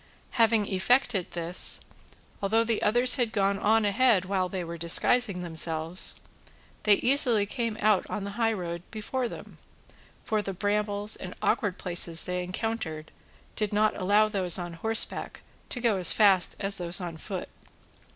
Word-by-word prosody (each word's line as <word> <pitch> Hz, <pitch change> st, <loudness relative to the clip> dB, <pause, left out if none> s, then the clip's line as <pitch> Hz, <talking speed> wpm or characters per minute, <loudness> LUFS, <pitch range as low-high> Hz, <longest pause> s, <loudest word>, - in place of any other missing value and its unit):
Having 225 Hz, -3 st, +2 dB
effected 200 Hz, 0 st, 0 dB
this, 170 Hz, +1 st, +1 dB, 0.6 s
although 220 Hz, +3 st, +2 dB
the 230 Hz, -1 st, -2 dB
others 245 Hz, +5 st, +2 dB
had 240 Hz, -3 st, 0 dB
gone 200 Hz, -1 st, 0 dB
on 220 Hz, +1 st, +2 dB
ahead 205 Hz, -2 st, +2 dB
while 185 Hz, -1 st, -1 dB
they 185 Hz, -1 st, -4 dB
were 170 Hz, 0 st, -7 dB
disguising 180 Hz, +4 st, +2 dB
themselves, 165 Hz, 0 st, 0 dB, 0.7 s
they 210 Hz, -1 st, +6 dB
easily 245 Hz, -4 st, +2 dB
came 230 Hz, 0 st, -4 dB
out 210 Hz, -3 st, +1 dB
on 210 Hz, -, -4 dB
the 200 Hz, -, -5 dB
high 225 Hz, +2 st, 0 dB
road 170 Hz, -5 st, -5 dB
before 240 Hz, +4 st, -3 dB
them, -, -, -11 dB, 0.6 s
for 215 Hz, -2 st, -1 dB
the 195 Hz, -1 st, -5 dB
brambles 205 Hz, +2 st, -1 dB
and 180 Hz, -, -9 dB
awkward 205 Hz, -5 st, 0 dB
places 170 Hz, -2 st, +2 dB
they 180 Hz, 0 st, -3 dB
encountered 180 Hz, -5 st, -5 dB, 0.4 s
did 210 Hz, -2 st, -2 dB
not 215 Hz, +1 st, +2 dB
allow 205 Hz, +3 st, +2 dB
those 190 Hz, -5 st, +3 dB
on 175 Hz, -2 st, -6 dB
horseback 225 Hz, +7 st, -1 dB, 0.3 s
to 245 Hz, -, -5 dB
go 230 Hz, -4 st, +1 dB
as 180 Hz, -, +4 dB
fast 195 Hz, -4 st, +4 dB
as 200 Hz, 0 st, 0 dB
those 175 Hz, +1 st, 0 dB
on 175 Hz, -3 st, -6 dB
foot. 160 Hz, -, -6 dB
200 Hz, 155 wpm, -27 LUFS, 180-225 Hz, 0.7 s, they